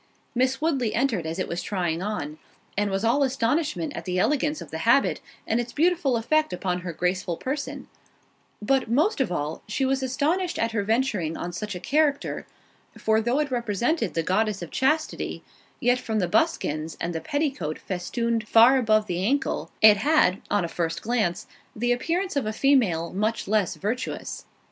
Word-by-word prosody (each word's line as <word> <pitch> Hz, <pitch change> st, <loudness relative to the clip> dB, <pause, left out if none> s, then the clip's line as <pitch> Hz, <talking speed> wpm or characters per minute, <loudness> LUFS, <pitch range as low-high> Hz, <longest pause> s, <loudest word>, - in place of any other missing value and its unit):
Miss 255 Hz, +2 st, +1 dB
Woodley 275 Hz, -8 st, 0 dB
entered 230 Hz, -10 st, 0 dB
as 165 Hz, +2 st, -4 dB
it 185 Hz, -, -2 dB
was 175 Hz, -, -3 dB
trying 175 Hz, -4 st, -2 dB
on, 160 Hz, -7 st, -4 dB, 0.4 s
and 205 Hz, 0 st, +1 dB
was 195 Hz, +1 st, -1 dB
all 245 Hz, +5 st, +3 dB
astonishment 280 Hz, +4 st, 0 dB
at -, -, -5 dB
the 180 Hz, -1 st, -2 dB
elegance 295 Hz, +8 st, +1 dB
of -, -, -10 dB
the -, -, -4 dB
habit, -, -, +3 dB, 0.2 s
and 225 Hz, -, +1 dB
its 240 Hz, 0 st, -3 dB
beautiful 320 Hz, -5 st, +2 dB
effect 310 Hz, +7 st, +1 dB
upon 180 Hz, 0 st, -2 dB
her 180 Hz, -1 st, -4 dB
graceful 180 Hz, +1 st, -1 dB
person; 280 Hz, +2 st, -4 dB, 0.8 s
but, 260 Hz, +1 st, +1 dB
most 300 Hz, -, +2 dB
of 260 Hz, -, 0 dB
all, 155 Hz, -2 st, -3 dB
she 240 Hz, +6 st, 0 dB
was 270 Hz, 0 st, +1 dB
astonished 315 Hz, +8 st, 0 dB
at 230 Hz, 0 st, 0 dB
her 220 Hz, -2 st, 0 dB
venturing 210 Hz, -7 st, 0 dB
on 175 Hz, 0 st, -5 dB
such 205 Hz, +3 st, -4 dB
a -, -, -5 dB
character—for 280 Hz, -, -1 dB
though 240 Hz, +4 st, 0 dB
it 295 Hz, -2 st, 0 dB
represented 235 Hz, -, 0 dB
the 165 Hz, -, +1 dB
goddess 200 Hz, +1 st, 0 dB
of 170 Hz, -, -8 dB
Chastity, 305 Hz, +4 st, 0 dB, 0.4 s
yet 245 Hz, -1 st, +2 dB
from 220 Hz, -3 st, -2 dB
the 185 Hz, -4 st, +1 dB
buskins, 165 Hz, -, 0 dB
and 170 Hz, +1 st, -2 dB
the 160 Hz, -, -3 dB
petticoat 270 Hz, -, -2 dB
festooned 225 Hz, +4 st, -2 dB
far 235 Hz, +5 st, +7 dB
above 215 Hz, -3 st, +3 dB
the 180 Hz, -2 st, -2 dB
ankle, 270 Hz, +7 st, 0 dB
it 215 Hz, -1 st, +9 dB
had, 210 Hz, -, +3 dB
on 205 Hz, -4 st, +1 dB
a -, -, -2 dB
first 165 Hz, 0 st, -3 dB
glance, 215 Hz, -7 st, 0 dB, 0.3 s
the 240 Hz, +3 st, 0 dB
appearance 340 Hz, +10 st, -1 dB
of 275 Hz, -6 st, 0 dB
a 215 Hz, -, -2 dB
female 215 Hz, -11 st, +2 dB
much 215 Hz, +4 st, -1 dB
less 210 Hz, -2 st, +1 dB
virtuous. 225 Hz, +6 st, -4 dB
225 Hz, 175 wpm, -25 LUFS, 185-270 Hz, 0.8 s, it